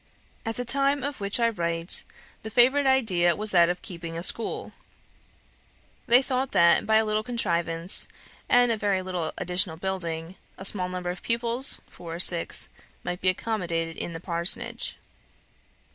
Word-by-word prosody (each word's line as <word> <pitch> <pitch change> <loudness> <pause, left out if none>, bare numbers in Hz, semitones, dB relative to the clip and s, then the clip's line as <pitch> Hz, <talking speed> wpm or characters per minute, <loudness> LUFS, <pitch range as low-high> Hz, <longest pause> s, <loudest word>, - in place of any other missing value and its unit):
At 225 - -2
the 245 - -4
time 275 +2 +1
of 285 -2 -4
which 200 +3 0
I 230 0 +3
write, 170 -4 +1 0.4
the 220 - -7
favourite 260 +5 +4
idea 190 -10 +3
was 215 0 -4
that 170 -2 +5
of 180 0 -3
keeping 170 -2 -7
a 170 - -4
school. 225 +4 0 1.4
They 245 +3 +6
thought 260 0 -2
that, 170 0 +4
by 220 - +3
a 220 0 +4
little 215 0 0
contrivance, 175 -7 0 0.4
and 245 -1 +5
a 225 - 0
very 200 -3 0
little 180 -4 -3
additional 180 -2 0
building, 170 -2 -4 0.2
a 190 - -9
small 185 -2 +1
number 180 -1 -3
of 180 - -9
pupils, 235 +2 +1
four 165 -1 -9
or - - -7
six, 175 -1 +2 0.4
might 175 0 -4
be 185 - +3
accommodated 170 -5 -2
in 170 - -5
the 165 - -6
parsonage. 170 0 -1
185 Hz, 160 wpm, -26 LUFS, 170-230 Hz, 1.4 s, They